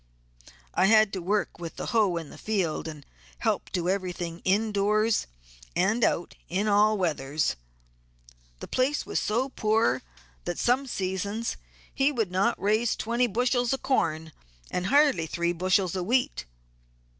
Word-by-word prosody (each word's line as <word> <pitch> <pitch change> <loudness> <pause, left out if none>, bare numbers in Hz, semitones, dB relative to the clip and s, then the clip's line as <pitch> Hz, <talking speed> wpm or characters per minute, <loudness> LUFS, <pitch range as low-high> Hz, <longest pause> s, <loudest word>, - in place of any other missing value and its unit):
I - - +3
had 215 -1 +5
to 190 - -3
work 200 0 -1
with 170 -2 -7
the - - -5
hoe 210 -6 +3
in 165 -3 -6
the - - -11
field 185 -8 -1
and 150 -3 -8 0.3
help - - -1
do 175 -1 -1
everything 180 -3 -2
in 210 +4 +2
doors 210 +2 +2 0.5
and 220 +6 +2
out 170 - +1 0.2
in 195 +5 0
all 210 +1 +4
weathers. 150 - 0 1.1
The - - -6
place 265 +4 0
was - - -1
so 240 +6 0
poor 215 - +1 0.4
that 175 - -3
some 260 +3 +1
seasons 200 +2 -2 0.4
he 275 +2 +2
would 225 -9 -1
not 195 +6 +1
raise 215 +3 +1
twenty 235 +2 0
bushels 245 +2 +1
of 270 - -4
corn 160 - 0 0.4
and 180 0 -1
hardly 280 - +4
three 170 +1 -1
bushels 185 +1 +1
of 180 -1 -2
wheat. 250 - +1
200 Hz, 150 wpm, -27 LUFS, 175-230 Hz, 1.1 s, had